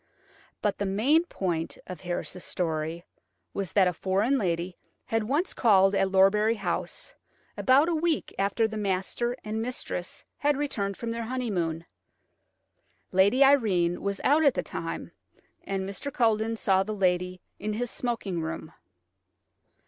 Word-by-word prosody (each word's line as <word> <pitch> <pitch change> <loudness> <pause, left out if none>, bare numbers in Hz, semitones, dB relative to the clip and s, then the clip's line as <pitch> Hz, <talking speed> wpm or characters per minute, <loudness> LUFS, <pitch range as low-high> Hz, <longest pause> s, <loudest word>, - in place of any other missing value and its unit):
But 210 - 0
the 200 - 0
main 265 - +3
point 175 - -3
of 180 -3 -8
Harris's 180 0 -4
story 165 0 -2 0.5
was 195 -3 -3
that 195 -3 +5
a 180 - +1
foreign 200 - +1
lady 175 -2 -1 0.3
had 225 -2 0
once 295 - 0
called 195 -4 +4
at 195 -1 +3
Lorbury 205 +4 +4
House, 200 - -3 0.4
about 275 +4 +4
a 345 - +1
week 325 -1 0
after 200 +3 +2
the 220 -1 -5
master 205 +5 -1
and 215 +1 -3
mistress 230 -7 -5
had 290 -1 +2
returned 200 -9 -2
from 230 -1 -4
their 230 0 -3
honeymoon. 185 -10 -2 1.3
Lady 200 +8 +5
Irene 200 -11 +3
was 200 0 -2
out 300 +3 +4
at 280 - +4
the - - -1
time, - - -5 0.5
and 190 -1 -2
Mr. 200 +9 -5
Culledon 225 -2 +2
saw 190 -3 +3
the 210 +2 -3
lady 180 -1 +1 0.2
in 210 +1 -2
his 240 +2 -2
smoking 210 -8 -2
room. 160 0 -5
200 Hz, 145 wpm, -27 LUFS, 185-240 Hz, 1.3 s, that